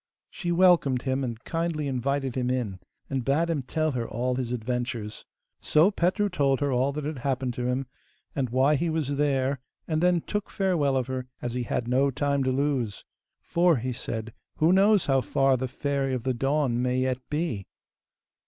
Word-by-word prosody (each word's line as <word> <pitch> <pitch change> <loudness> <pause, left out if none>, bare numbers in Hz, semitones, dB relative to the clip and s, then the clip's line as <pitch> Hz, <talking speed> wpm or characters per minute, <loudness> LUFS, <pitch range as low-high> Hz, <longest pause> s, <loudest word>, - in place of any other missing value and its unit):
She 175 -2 -3
welcomed 170 -8 +4
him, 130 0 0
and 120 -3 -4
kindly 165 -3 -2
invited 135 0 -1
him 125 -1 -1
in, 120 -7 -2 0.3
and 135 -2 -2
bade 155 +6 +1
him 150 -4 0
tell 155 +4 -1
her 120 -3 -3
all 125 +3 -1
his 125 -2 -2
adventures. 120 -2 -3 0.3
So 160 +6 +4
Petru 195 +3 +1
told 140 -8 +1
her 145 -1 0
all 130 +2 +2
that 150 0 -4
had 150 -3 -4
happened 130 -1 -1
to 125 +1 -2
him, 130 +2 -1 0.5
and 130 -3 0
why 135 +5 +3
he 170 +4 0
was 150 -3 -1
there, 140 -2 +1 0.3
and 155 -1 0
then 175 -1 +3
took 210 +4 -3
farewell 165 -9 +1
of 130 - 0
her, 130 0 -4
as 120 -1 -4
he 125 - -1
had 120 0 -2
no 130 +3 +3
time 140 0 0
to 130 - +2
lose. 130 -6 -1 0.4
'For,' 170 -1 +3
he 125 +2 -2
said, 115 -1 -5 0.2
'who 160 +3 +4
knows 200 0 +5
how 135 -1 +3
far 135 +4 +2
the 130 +1 -2
Fairy 135 0 -1
of 120 - -4
the 130 0 0
Dawn 135 -1 +1
may 125 0 +1
yet 130 0 0
be? 150 - -2
135 Hz, 190 wpm, -27 LUFS, 125-150 Hz, 0.5 s, knows